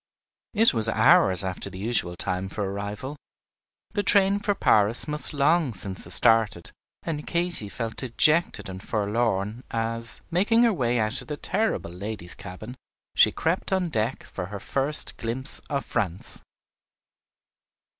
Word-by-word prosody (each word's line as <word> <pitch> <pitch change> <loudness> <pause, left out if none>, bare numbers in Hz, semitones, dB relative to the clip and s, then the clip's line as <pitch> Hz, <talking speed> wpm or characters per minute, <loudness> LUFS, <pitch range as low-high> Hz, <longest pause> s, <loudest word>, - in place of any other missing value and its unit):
It 225 +2 +5
was 115 -1 +6
hours 100 -4 +5
after 95 -1 -4
the - - -10
usual 100 -4 -1
time 90 +2 -3
for 105 - -4
arrival; 100 +8 -5 0.7
the 205 - -1
train 200 0 +4
for 205 0 -1
Paris 105 - +2
must 150 0 0
long 145 -3 +1
since 95 0 -2
have - - -4
started, 115 -7 +2 0.3
and 150 -2 -5
Katy 170 - 0
felt 115 +1 -5
dejected 150 +3 +2
and 95 -1 -8
forlorn 105 +1 -2
as, 115 0 -3
making 210 +7 +3
her 230 -2 +3
way 125 -7 0
out 110 +3 -1
of - - -13
the 150 - -5
terrible 220 - -2
ladies' 90 -1 -6
cabin, 110 +7 -10 0.4
she - - +6
crept 165 +5 -2
on 185 -2 0
deck 115 -1 -2
for 90 -2 -7
her 100 0 -7
first 140 +8 -2
glimpse 120 +4 -1
of 140 -5 -2
France. 95 -3 -4
115 Hz, 145 wpm, -25 LUFS, 100-150 Hz, 0.7 s, was